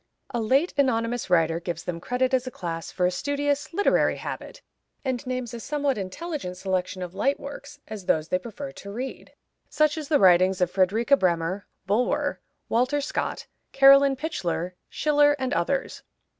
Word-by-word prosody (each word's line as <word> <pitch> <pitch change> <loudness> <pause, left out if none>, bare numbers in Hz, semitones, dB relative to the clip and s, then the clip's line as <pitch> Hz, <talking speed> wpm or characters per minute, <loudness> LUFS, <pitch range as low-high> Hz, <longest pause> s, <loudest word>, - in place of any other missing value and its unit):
A 240 - -1
late 270 +10 +2
anonymous 240 -4 +1
writer 165 -2 +3
gives 170 -1 -5
them 170 -2 -4
credit 255 +4 0
as 260 0 +1
a - - -1
class 165 -7 -5
for 180 - 0
a 180 - +2
studious, 285 +5 -1
literary 405 +4 +2
habit, - - -7 0.4
and 255 -3 -1
names 255 -2 -3
a 235 - -5
somewhat 285 +1 -1
intelligent 200 - -5
selection 185 0 -2
of 175 -1 -7
light 270 +9 0
works 285 +1 -9
as 210 -4 -8
those 155 0 +2
they 180 - +1
prefer 255 +7 -7
to 200 - -10
read, 255 +5 -6 0.4
such 305 +1 +2
as 300 - -6
the 295 - +4
writings 185 -1 +5
of 180 -1 +1
Fredrika 215 +8 +3
Bremer, 185 -2 0 0.2
Bulwer, 215 +5 0 0.3
Walter 255 +5 +1
Scott, 285 - -3 0.3
Caroline 275 0 +7
Pichler, 180 - -3 0.2
Schiller, 290 -1 +3
and 260 0 -2
others. - - -1
240 Hz, 165 wpm, -25 LUFS, 185-280 Hz, 0.4 s, Caroline